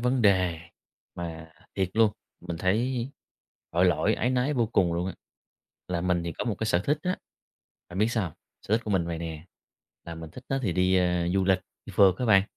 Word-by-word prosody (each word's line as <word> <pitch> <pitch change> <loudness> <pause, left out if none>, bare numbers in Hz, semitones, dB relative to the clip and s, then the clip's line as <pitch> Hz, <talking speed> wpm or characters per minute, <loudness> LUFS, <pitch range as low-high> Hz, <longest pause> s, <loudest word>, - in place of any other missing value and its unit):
vấn 125 0 +1
đề 95 -5 +3 0.6
mà 80 -2 -6 0.2
thiệt 95 -2 0
luôn, 110 -2 +4 0.3
mình 85 -1 -5
thấy 120 +7 +1 0.6
tội 85 +2 +3
lỗi, 90 -4 +3
áy 125 - 0
náy 130 +3 +1
vô 120 -2 +2
cùng 95 -6 +2
luôn 85 +2 -1
á. 95 - -4 0.7
Là 85 -2 -1
mình 90 -1 +1
thì 85 - -3
có - - -4
một 115 -4 0
cái 110 - -1
sở 90 -5 +3
thích 145 +1 +2
á, 180 +1 0 0.7
bạn 90 - -6
biết 105 +2 +4
sao 110 -4 +1
hông? 85 - -5 0.3
Sở 105 - +1
thích 115 - -6
của 105 - -3
mình 95 -4 +2
vầy 85 -1 -3
nè, 80 -1 -6 0.6
là 85 - -6
mình 80 -1 -8
thích 125 +7 -11
á 135 - +1
thì 100 -7 +1
đi, 95 +1 +3
a, 90 -1 +2
du 95 -1 +3
lịch, 95 -1 +3 0.3
đi - - -8
phượt 95 -3 +6
á 125 - -1
bạn. 100 -3 +6
95 Hz, 225 wpm, -27 LUFS, 85-115 Hz, 0.7 s, phượt